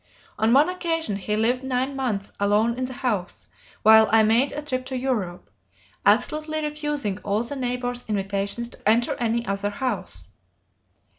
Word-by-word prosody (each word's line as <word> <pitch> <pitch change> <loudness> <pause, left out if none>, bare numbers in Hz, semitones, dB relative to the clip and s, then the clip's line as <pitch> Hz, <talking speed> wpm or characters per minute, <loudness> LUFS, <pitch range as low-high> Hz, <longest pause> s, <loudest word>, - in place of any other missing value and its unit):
On 220 +1 +3
one 280 +5 +6
occasion 330 - -1
he 210 +2 -2
lived 240 +4 +1
nine 265 +1 -1
months 220 -7 -2
alone 210 +3 +2
in 255 +1 -2
the 260 - -6
house 200 -7 -2 0.3
while 220 0 +7
I 225 0 +6
made 230 +6 +3
a 295 - -5
trip 255 -3 -2
to 260 - -3
Europe, 220 -9 -3 0.6
absolutely 305 +8 +2
refusing 295 -9 -2
all 205 +2 -1
the 240 +4 -5
neighbors' 245 -1 -3
invitations 200 +2 -1
to 215 - -3
enter 235 +2 +3
any 235 0 0
other 200 0 -1
house. 205 - -4
235 Hz, 155 wpm, -24 LUFS, 205-265 Hz, 0.6 s, while